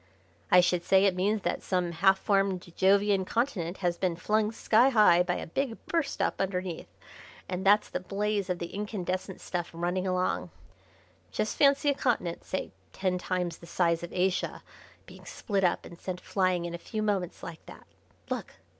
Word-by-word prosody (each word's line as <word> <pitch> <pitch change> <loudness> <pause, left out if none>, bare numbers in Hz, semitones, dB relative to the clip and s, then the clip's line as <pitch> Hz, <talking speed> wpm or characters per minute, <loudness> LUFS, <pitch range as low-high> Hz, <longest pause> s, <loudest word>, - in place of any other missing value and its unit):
"I 180 - +7
should 180 -1 +1
say 190 +2 +4
it 195 - +4
means 200 +3 0
that - - -1
some 180 -2 -1
half 190 +4 +4
formed 195 -2 +1
Jovian 200 0 +3
Continent 195 -5 -1
has 175 -1 0
been 180 -3 0
flung 215 +5 +1
sky 230 +3 +4
high 210 -8 +6
by 180 0 0
a - - -4
big 240 +6 -2
burst 325 -5 -1
up - - -1
underneath, 185 -3 -3 0.6
and 185 0 -3
that's 205 +2 +5
the - - -3
blaze 200 +1 -2
of 180 - 0
the 170 0 -6
incandescent 190 -2 -4
stuff 175 -2 -3
running 175 +3 -2
along. 185 0 0 0.8
Just 215 - -2
fancy 280 0 +4
a - - +4
continent, 225 -11 -1
say 190 - -4 0.2
ten 185 -1 -1
times 180 -2 -2
the 170 - -13
size 170 -1 +1
of 175 - -7
Asia, 185 0 -1 0.4
being - - -14
split 200 -3 -2
up 175 - +1
and 170 - -12
sent 180 -1 -4
flying 185 -3 0
in 170 - -5
a 170 - -5
few 215 +4 -4
moments 195 -5 -2
like 165 -1 -8
that. - - -12 0.5
Look! - - -4
185 Hz, 180 wpm, -29 LUFS, 175-205 Hz, 0.8 s, I